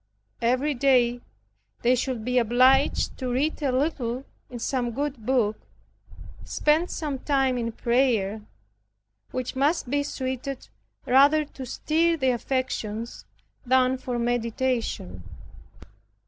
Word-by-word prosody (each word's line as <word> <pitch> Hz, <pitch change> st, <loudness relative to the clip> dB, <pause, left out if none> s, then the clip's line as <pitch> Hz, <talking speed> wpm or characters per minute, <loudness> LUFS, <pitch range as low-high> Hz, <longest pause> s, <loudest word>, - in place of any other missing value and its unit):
Every 255 Hz, +5 st, +1 dB
day 245 Hz, -2 st, +3 dB, 0.6 s
they 245 Hz, +1 st, +4 dB
should 250 Hz, -3 st, -2 dB
be 250 Hz, 0 st, +2 dB
obliged 255 Hz, +4 st, +3 dB
to 255 Hz, -2 st, -2 dB
read 290 Hz, +6 st, 0 dB
a 280 Hz, -3 st, +1 dB
little 255 Hz, -2 st, -1 dB, 0.2 s
in 245 Hz, -, -7 dB
some 240 Hz, 0 st, -2 dB
good 270 Hz, -4 st, -4 dB
book, 230 Hz, -5 st, +1 dB, 0.8 s
spend 310 Hz, +4 st, +1 dB
some 290 Hz, -4 st, -3 dB
time 270 Hz, -2 st, +1 dB
in 230 Hz, -1 st, -2 dB
prayer, 225 Hz, -4 st, +1 dB, 0.9 s
which 255 Hz, 0 st, -4 dB
must 280 Hz, -1 st, +1 dB
be 285 Hz, 0 st, +2 dB
suited 260 Hz, -1 st, -4 dB, 0.4 s
rather 285 Hz, +4 st, +5 dB
to 265 Hz, -3 st, -9 dB
stir 330 Hz, +6 st, +1 dB
the 265 Hz, -3 st, +2 dB
affections, 235 Hz, -3 st, -3 dB, 0.4 s
than 255 Hz, 0 st, +2 dB
for 250 Hz, -1 st, -3 dB
meditation. 235 Hz, -, -1 dB
255 Hz, 115 wpm, -25 LUFS, 240-275 Hz, 0.9 s, rather